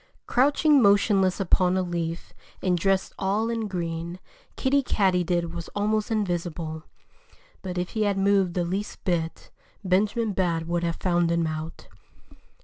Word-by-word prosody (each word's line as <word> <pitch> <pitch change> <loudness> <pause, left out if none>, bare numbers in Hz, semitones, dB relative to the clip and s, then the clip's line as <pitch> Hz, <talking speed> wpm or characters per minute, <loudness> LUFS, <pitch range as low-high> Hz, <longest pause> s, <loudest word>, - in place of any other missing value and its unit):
Crouching 285 +2 +4
motionless 200 -2 +3
upon 185 -1 +2
a 185 - +1
leaf, 170 -1 -4 0.3
and 185 -1 +1
dressed 190 +2 0
all 210 +4 0
in 225 -2 -2
green, 170 -2 -4 0.4
Kiddie 280 +1 +2
Katydid 180 -7 +1
was 170 -1 -6
almost 215 +2 0
invisible. 175 -6 -2 0.8
But 180 -2 -5
if 180 0 -2
he 220 - -3
had 205 -2 +1
moved 195 -2 +2
the 175 -1 0
least 195 +4 -4
bit, 165 -3 -2 0.3
Benjamin 205 +4 +1
Bat 170 -3 0
would 170 +1 -1
have 170 -1 -1
found 175 -2 +1
him 170 0 +1
out. 155 +1 -5
185 Hz, 140 wpm, -25 LUFS, 170-205 Hz, 0.8 s, Crouching